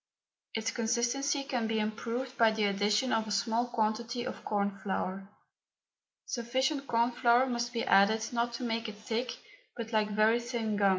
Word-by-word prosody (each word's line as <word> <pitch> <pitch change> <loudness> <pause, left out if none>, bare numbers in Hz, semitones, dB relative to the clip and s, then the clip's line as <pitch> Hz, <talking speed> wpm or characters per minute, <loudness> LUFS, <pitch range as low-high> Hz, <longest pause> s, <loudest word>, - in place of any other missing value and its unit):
Its 225 +2 -1
consistency 240 +5 0
can 250 -5 -1
be 225 0 0
improved 230 +4 -3
by 230 -2 +5
the 220 -1 -1
addition 210 +5 +2
of 220 -1 +1
a - - -5
small 225 +4 +1
quantity 235 +1 -1
of - - -6
corn 200 -1 0
flour. 195 0 -3 1.0
Sufficient 260 +4 -1
corn 235 +1 +2
flour 245 +1 +4
must 240 -1 -2
be 230 -2 -2
added 220 +3 +4
not 235 0 0
to 235 - -5
make 230 -1 -1
it 210 - -9
thick 225 +3 -3 0.4
but 230 -1 -5
like 215 -1 +2
very 215 +3 +3
thin 235 -3 -2
gum. 200 -1 +4
230 Hz, 170 wpm, -31 LUFS, 215-240 Hz, 1.0 s, by